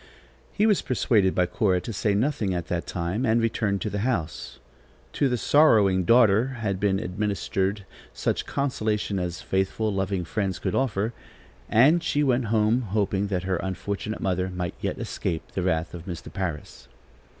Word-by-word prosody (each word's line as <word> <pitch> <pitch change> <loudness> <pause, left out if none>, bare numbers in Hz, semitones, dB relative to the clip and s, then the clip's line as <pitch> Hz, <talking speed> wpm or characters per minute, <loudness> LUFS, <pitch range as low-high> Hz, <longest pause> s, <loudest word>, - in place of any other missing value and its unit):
He 210 - +1
was 210 -3 +3
persuaded 105 -6 +2
by 90 - +3
Cora 90 +1 +1
to 115 - -6
say 105 0 0
nothing 110 -5 0
at 85 -1 -4
that 85 -1 -2
time 90 +7 -2
and 115 -2 +3
returned 110 -3 0
to 105 - -2
the 100 - -2
house. 100 -9 -2 0.6
To 140 - +1
the 125 - 0
sorrowing 105 - +4
daughter 115 +3 +4
had 100 -4 -2
been 100 -1 +2
administered 100 0 -2 0.3
such - - -2
consolation 110 -7 -1
as 90 -1 -4
faithful, 95 +3 0
loving 95 -2 -1
friends 95 0 -2
could - - -3
offer, 115 -3 0 0.6
and 145 +10 +5
she 150 -3 0
went 130 -3 +2
home 110 +2 +2
hoping 100 -2 -1
that 90 -3 -2
her 95 -1 0
unfortunate 100 +4 -4
mother 95 -1 0
might 90 -1 -4
yet - - -2
escape 80 -1 -4
the 95 - -2
wrath 85 -2 -1
of 85 0 -9
Mr. 85 -3 -7
Parris. 90 -6 -5
100 Hz, 165 wpm, -25 LUFS, 95-115 Hz, 0.6 s, and